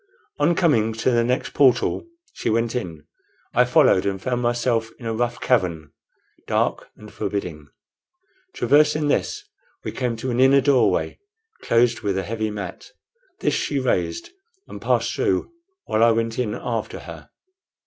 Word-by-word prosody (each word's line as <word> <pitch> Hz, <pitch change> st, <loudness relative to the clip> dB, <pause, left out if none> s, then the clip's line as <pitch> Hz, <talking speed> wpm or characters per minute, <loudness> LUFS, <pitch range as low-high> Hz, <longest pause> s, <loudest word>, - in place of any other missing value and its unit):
On 160 Hz, +4 st, +3 dB
coming 115 Hz, -, +2 dB
to 115 Hz, +3 st, 0 dB
the 120 Hz, -1 st, +3 dB
next 125 Hz, +2 st, -1 dB
portal 130 Hz, -, +2 dB, 0.3 s
she -, -, -3 dB
went 115 Hz, +1 st, 0 dB
in. 85 Hz, -10 st, -5 dB, 0.5 s
I 125 Hz, -, +4 dB
followed, 125 Hz, -, +4 dB
and 100 Hz, -1 st, -2 dB
found 125 Hz, +4 st, -2 dB
myself 120 Hz, -1 st, 0 dB
in 120 Hz, -, -12 dB
a 115 Hz, -, -1 dB
rough 120 Hz, +1 st, -2 dB
cavern, 85 Hz, -, 0 dB, 0.6 s
dark -, -, -1 dB
and -, -, -13 dB
forbidding. 85 Hz, -7 st, -4 dB, 0.9 s
Traversing 150 Hz, +3 st, +3 dB
this -, -, -1 dB, 0.4 s
we -, -, -4 dB
came 125 Hz, -2 st, -2 dB
to 125 Hz, +3 st, -3 dB
an 120 Hz, -, -1 dB
inner 135 Hz, +1 st, +6 dB
doorway, 135 Hz, -1 st, +2 dB, 0.4 s
closed 120 Hz, 0 st, +2 dB
with 100 Hz, -3 st, -1 dB
a 95 Hz, -, -1 dB
heavy 110 Hz, 0 st, -3 dB
mat. 100 Hz, -3 st, -7 dB, 0.5 s
This -, -, +1 dB
she 145 Hz, -, -1 dB
raised, 90 Hz, -, -1 dB, 0.4 s
and -, -, -9 dB
passed -, -, +1 dB
through, -, -, 0 dB, 0.3 s
while 110 Hz, -, +1 dB
I 115 Hz, -, +6 dB
went 115 Hz, 0 st, 0 dB
in 110 Hz, -4 st, -1 dB
after -, -, -4 dB
her. -, -, -11 dB
115 Hz, 155 wpm, -22 LUFS, 105-130 Hz, 0.9 s, inner